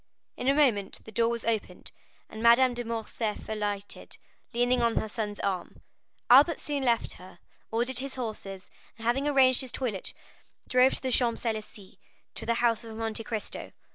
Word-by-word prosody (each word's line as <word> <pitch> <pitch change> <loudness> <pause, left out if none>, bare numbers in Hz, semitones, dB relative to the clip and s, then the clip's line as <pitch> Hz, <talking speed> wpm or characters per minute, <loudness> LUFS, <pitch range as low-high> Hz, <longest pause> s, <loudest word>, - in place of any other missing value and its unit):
In 250 - -4
a 275 - +4
moment 230 -10 +2
the 220 - -10
door 230 +2 +2
was 235 -1 -3
opened, 225 -2 -2 0.4
and 220 - -9
Madame 240 +2 +6
de 240 0 -4
Morcerf 225 -1 -3
alighted, 205 -2 -4 0.3
leaning 245 +1 +2
on 235 -1 +2
her - - 0
son's 210 -1 -4
arm. 190 -3 -3 0.5
Albert 285 +7 +7
soon 290 -2 -2
left 235 -3 +1
her, 185 +1 -13 0.3
ordered 240 +2 0
his 270 0 -4
horses, 205 -6 -6 0.3
and 225 - -9
having 270 +5 +1
arranged 265 -3 +5
his 260 -2 -4
toilet, 225 -8 -3 0.5
drove 255 +1 +4
to - - -5
the 260 - -1
Champs 240 -1 +1
Élysées, 215 -4 -5 0.3
to - - -6
the 235 - +2
house 230 -1 +2
of 225 -1 -8
Monte 225 0 -3
Cristo. 220 -1 -4
230 Hz, 170 wpm, -28 LUFS, 220-255 Hz, 0.5 s, Albert